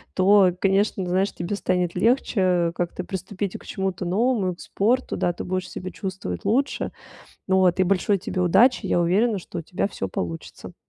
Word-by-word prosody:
то, 190 Hz, -1 st, +5 dB
конечно, 195 Hz, 0 st, +1 dB
знаешь, 185 Hz, +3 st, 0 dB
тебе 175 Hz, +4 st, -3 dB
станет 180 Hz, -3 st, 0 dB
легче, 230 Hz, +3 st, +1 dB
э, 180 Hz, -2 st, +2 dB
как-то 175 Hz, +1 st, -3 dB
приступить 190 Hz, +1 st, -4 dB
к -, -, -17 dB
чему-то 190 Hz, -1 st, -3 dB
новому 200 Hz, 0 st, +1 dB
и -, -, -14 dB
к -, -, -14 dB
спорту. 245 Hz, +6 st, 0 dB
Да, 175 Hz, -, 0 dB
ты -, -, -6 dB
будешь 185 Hz, 0 st, -3 dB
себя 185 Hz, +1 st, -6 dB
чувствовать 185 Hz, -, -5 dB
лучше. 270 Hz, +5 st, 0 dB, 0.6 s
Вот 190 Hz, -1 st, +3 dB
и -, -, +6 dB
большой 195 Hz, +2 st, +2 dB
тебе 185 Hz, 0 st, -4 dB
удачи. 195 Hz, +6 st, +4 dB
Я 175 Hz, -, +2 dB
уверена, 200 Hz, +6 st, +2 dB
что 180 Hz, -, -8 dB
у -, -, -4 dB
тебя 180 Hz, +4 st, -2 dB
всё 140 Hz, -, -4 dB
получится. 85 Hz, -3 st, -6 dB
185 Hz, 180 wpm, -24 LUFS, 180-200 Hz, 0.6 s, и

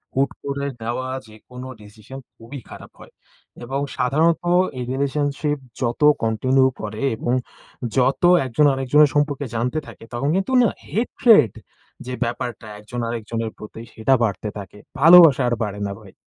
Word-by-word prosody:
হূট 135 Hz, +1 st, +2 dB, 0.2 s
করে 140 Hz, 0 st, -3 dB, 0.2 s
দেওয়া 125 Hz, +3 st, -3 dB, 0.2 s
যে 110 Hz, -, -15 dB
কোনো 125 Hz, +1 st, -9 dB
ডিসিশন 110 Hz, +5 st, -12 dB, 0.2 s
খুবই 125 Hz, +5 st, -10 dB
খারাপ -, -, -12 dB
হয়। -, -, -15 dB, 0.5 s
এবং 135 Hz, +3 st, -3 dB, 0.2 s
সাধারণত 155 Hz, +7 st, +1 dB, 0.3 s
এই 125 Hz, -, -4 dB
রিলেশনশিপ 145 Hz, +2 st, -1 dB, 0.2 s
যত 120 Hz, +3 st, -2 dB, 0.2 s
কন্টিনিউ 130 Hz, +4 st, +2 dB
করে 110 Hz, +2 st, -6 dB, 0.2 s
এবং 120 Hz, -, -2 dB, 0.6 s
যত 130 Hz, +1 st, +2 dB, 0.2 s
একজন 130 Hz, +4 st, +2 dB
আরেকজনের 140 Hz, +3 st, +3 dB
সম্পর্কে 145 Hz, -1 st, 0 dB
জানতে 125 Hz, +7 st, -1 dB
থাকে, -, -, -13 dB
তখন 135 Hz, +5 st, -1 dB
কিন্তু 195 Hz, +7 st, -1 dB
না? 230 Hz, -, +3 dB, 0.2 s
হেট্রেড 225 Hz, -, +3 dB, 0.5 s
যে 125 Hz, -, -5 dB
ব্যাপারটা, 120 Hz, -2 st, -5 dB
একজন 115 Hz, +4 st, -7 dB
আরেকজনের 115 Hz, -1 st, -4 dB
প্রতি, 110 Hz, +1 st, -10 dB
সেটা 110 Hz, +4 st, +1 dB
বাড়তে 105 Hz, 0 st, -2 dB
থাকে, 100 Hz, 0 st, -10 dB, 0.2 s
ভালোবাসা 165 Hz, -2 st, +8 dB
আর 120 Hz, -, +1 dB
বাড়ে 105 Hz, -1 st, -5 dB
না 100 Hz, -, -5 dB
ভাই। 95 Hz, -3 st, -16 dB
130 Hz, 150 wpm, -21 LUFS, 115-140 Hz, 0.6 s, ভালোবাসা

